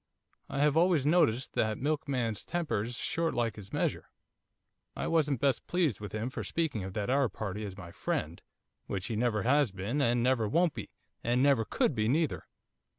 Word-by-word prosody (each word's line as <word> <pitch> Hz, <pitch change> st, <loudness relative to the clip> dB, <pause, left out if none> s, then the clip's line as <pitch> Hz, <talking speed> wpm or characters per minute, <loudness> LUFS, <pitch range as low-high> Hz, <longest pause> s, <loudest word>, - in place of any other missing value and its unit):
I 140 Hz, -, -1 dB
have 150 Hz, 0 st, +3 dB
always 165 Hz, -4 st, +3 dB
noticed 145 Hz, -6 st, +3 dB
that 110 Hz, -1 st, +1 dB
milkman's 135 Hz, -7 st, -1 dB
temper's 125 Hz, -9 st, -2 dB
short 165 Hz, 0 st, -1 dB
like 115 Hz, -3 st, 0 dB
his 100 Hz, -2 st, -10 dB
measure. -, -, -1 dB, 0.9 s
I -, -, -3 dB
wasn't 150 Hz, -6 st, +1 dB
best 140 Hz, 0 st, +1 dB
pleased 165 Hz, -, +1 dB
with 105 Hz, -2 st, -7 dB
him 110 Hz, +4 st, -3 dB
for -, -, -4 dB
speaking 160 Hz, -, -1 dB
of 95 Hz, 0 st, -6 dB
that 105 Hz, +4 st, -1 dB
Arab 135 Hz, -6 st, +2 dB
party 105 Hz, 0 st, -4 dB
as 95 Hz, -2 st, -7 dB
my 90 Hz, -4 st, -9 dB
friend, 80 Hz, 0 st, -3 dB, 0.5 s
which 95 Hz, -1 st, -3 dB
he 110 Hz, -, -3 dB
never 110 Hz, -2 st, +1 dB
has 140 Hz, +1 st, +3 dB
been, 100 Hz, +9 st, -2 dB
and 120 Hz, -2 st, +2 dB
never 125 Hz, -3 st, +2 dB
won't 170 Hz, +7 st, +2 dB
be, -, -, -7 dB, 0.3 s
and 120 Hz, +2 st, +2 dB
never 135 Hz, -6 st, +4 dB
could 125 Hz, -, +1 dB
be 110 Hz, -3 st, 0 dB
neither. 155 Hz, +5 st, 0 dB
125 Hz, 185 wpm, -31 LUFS, 105-145 Hz, 0.9 s, never